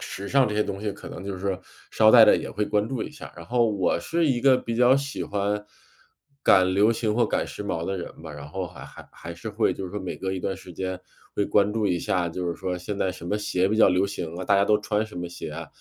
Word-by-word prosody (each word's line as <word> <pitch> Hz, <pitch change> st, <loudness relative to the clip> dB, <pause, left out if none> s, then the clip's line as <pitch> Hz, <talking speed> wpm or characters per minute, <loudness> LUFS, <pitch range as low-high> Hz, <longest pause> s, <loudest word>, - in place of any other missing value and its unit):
时 100 Hz, +1 st, -6 dB
尚 135 Hz, -1 st, +4 dB
这 105 Hz, -, -3 dB
些 105 Hz, -, +3 dB
东 100 Hz, -1 st, -5 dB
西 105 Hz, -1 st, -2 dB
可 100 Hz, -, -10 dB
能 -, -, -8 dB
就 100 Hz, -1 st, -4 dB
是 95 Hz, 0 st, -2 dB, 0.3 s
捎 110 Hz, -1 st, +5 dB
带 -, -, +9 dB
着 -, -, +6 dB
也 -, -, -5 dB
会 105 Hz, +1 st, -1 dB
关 105 Hz, +1 st, 0 dB
注 130 Hz, -4 st, -2 dB
一 -, -, -6 dB
下。 -, -, -11 dB
然 85 Hz, -, -9 dB
后 120 Hz, -1 st, +2 dB
我 100 Hz, -4 st, +1 dB
是 170 Hz, 0 st, 0 dB
一 130 Hz, -4 st, +1 dB
个 130 Hz, 0 st, +5 dB
比 115 Hz, -2 st, -4 dB
较 125 Hz, +2 st, +6 dB
喜 140 Hz, 0 st, -3 dB
欢 105 Hz, +1 st, -1 dB, 0.8 s
赶 95 Hz, -1 st, +5 dB
流 105 Hz, +4 st, +4 dB
行 115 Hz, -2 st, -1 dB
或 120 Hz, +1 st, +3 dB
赶 -, -, 0 dB
时 105 Hz, -, -7 dB
髦 85 Hz, -4 st, -2 dB
的 95 Hz, +2 st, -2 dB
人 85 Hz, -, -8 dB
吧， 80 Hz, -2 st, -8 dB
然 75 Hz, 0 st, -9 dB
后 95 Hz, +4 st, -4 dB
还 90 Hz, 0 st, -11 dB
还 -, -, -13 dB
还 -, -, -9 dB
是 -, -, -7 dB
会 -, -, +1 dB
就 95 Hz, -, -6 dB
是 90 Hz, -, -6 dB
说 105 Hz, -, -4 dB
每 95 Hz, -, -4 dB
隔 95 Hz, 0 st, -3 dB
一 95 Hz, -, -3 dB
段 95 Hz, +1 st, -2 dB
时 95 Hz, -1 st, -12 dB
间 95 Hz, +1 st, -4 dB, 0.4 s
会 100 Hz, -, +1 dB
关 100 Hz, 0 st, +3 dB
注 110 Hz, -1 st, -1 dB
一 90 Hz, -3 st, +1 dB
下， 85 Hz, +1 st, 0 dB
就 90 Hz, +2 st, -4 dB
是 85 Hz, -, -2 dB
说 90 Hz, +1 st, -3 dB
现 100 Hz, +3 st, -5 dB
在 95 Hz, -, +1 dB
什 85 Hz, -, -10 dB
么 105 Hz, -, 0 dB
鞋 95 Hz, -3 st, 0 dB
比 110 Hz, -, 0 dB
较 110 Hz, -, +6 dB
流 95 Hz, +2 st, +2 dB
行 85 Hz, -5 st, -5 dB
啊， 95 Hz, -, -4 dB
大 100 Hz, -, +3 dB
家 100 Hz, 0 st, +4 dB
都 105 Hz, +1 st, +3 dB
穿 105 Hz, 0 st, -1 dB
什 110 Hz, -, -12 dB
么 90 Hz, 0 st, -4 dB
鞋 85 Hz, -2 st, -7 dB
啊， 80 Hz, +2 st, -6 dB
100 Hz, 305 characters per minute, -25 LUFS, 90-110 Hz, 0.8 s, 带